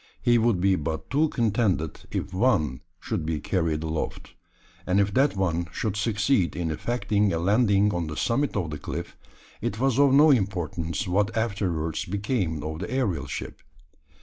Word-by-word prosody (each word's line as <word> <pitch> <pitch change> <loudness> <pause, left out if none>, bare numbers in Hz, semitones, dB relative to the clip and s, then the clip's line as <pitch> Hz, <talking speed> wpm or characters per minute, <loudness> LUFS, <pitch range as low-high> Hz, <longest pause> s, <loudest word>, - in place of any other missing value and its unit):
He 120 -1 +3
would 115 -4 +2
be 95 +1 +3
but 80 -1 -4
too 150 +3 +3
contented 105 - 0
if - - -4
one 85 - +1 0.2
should - - -3
be 80 -1 -2
carried 80 -2 -1
aloft; 80 0 -4 0.5
and 90 +2 +3
if 100 0 +1
that 135 0 +3
one 85 -3 0
should 105 -3 -2
succeed 110 -1 +1
in 85 -2 -2
effecting 105 +2 0
a 85 - 0
landing 100 +2 +3
on 85 -2 -2
the 75 0 -6
summit 135 +4 0
of 85 -6 -2
the 75 - -5
cliff, - - -6 0.5
it 105 - -3
was 135 0 +2
of 140 -1 +6
no 145 +3 +7
importance 90 - -1
what 100 +5 +1
afterwards 95 -8 -1
became 100 - -2
of 80 +1 -4
the 90 - -5
aerial 110 - -1
ship. - - -6
100 Hz, 170 wpm, -26 LUFS, 80-115 Hz, 0.5 s, no